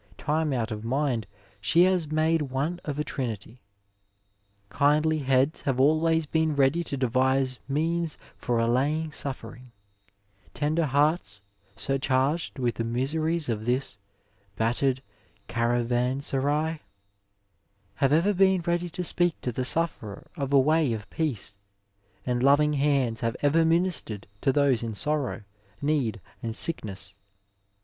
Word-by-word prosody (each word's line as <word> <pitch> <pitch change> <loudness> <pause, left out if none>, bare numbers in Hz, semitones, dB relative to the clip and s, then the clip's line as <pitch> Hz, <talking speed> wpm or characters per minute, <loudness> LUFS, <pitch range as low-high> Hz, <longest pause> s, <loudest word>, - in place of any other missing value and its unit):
Time 155 0 0
out 120 -3 -1
of 105 0 -5
mind 125 -3 -1 0.3
she 165 - +4
has 180 -5 +1
made 160 +1 +2
one 145 +5 -2
of 145 -2 -4
a 150 - 0
trinity. 115 -3 -5 1.1
Kindly 150 +5 +2
heads 135 +2 +1
have 135 -2 -1
always 160 +3 +3
been 160 0 0
ready 140 +5 +3
to 140 - -4
devise 130 +1 +1
means 160 +3 -1 0.2
for 120 -3 -1
allajmig 140 +7 +1
suffering 125 -3 -6 0.4
[ 100 0 -34
tender 155 +2 +1
hearts, 140 - +1 0.3
surcharged 135 +6 0
with 120 -3 -1
the 115 - -1
miseries 150 +7 -1
of 110 -2 -2
this 125 -2 -1 0.3
'' 100 -1 -38
battered 125 +3 +1 0.4
caravanserai," 130 +6 0 1.2
have 135 -1 +2
ever 170 +7 +3
been 190 -1 +3
ready 175 0 -1
to 180 +2 -4
speak 175 -1 +1
to 125 - -2
the 130 +2 -2
sufferer 125 -9 -1
of 140 -4 -3
a 140 - +6
way 150 -1 +3
of 110 -1 -6
peace, 125 -10 -3 0.7
and 125 -1 0
loving 145 +3 +4
hands 135 -5 +1
have 115 +1 -1
ever 155 +3 +4
ministered 165 - 0 0.2
to 135 - +3
those 140 -4 +3
in 115 -2 -4
sorrow, 145 -2 0 0.4
need 140 -7 0 0.2
and 115 -1 -3
sickness. 100 - 0
140 Hz, 135 wpm, -27 LUFS, 120-155 Hz, 1.2 s, a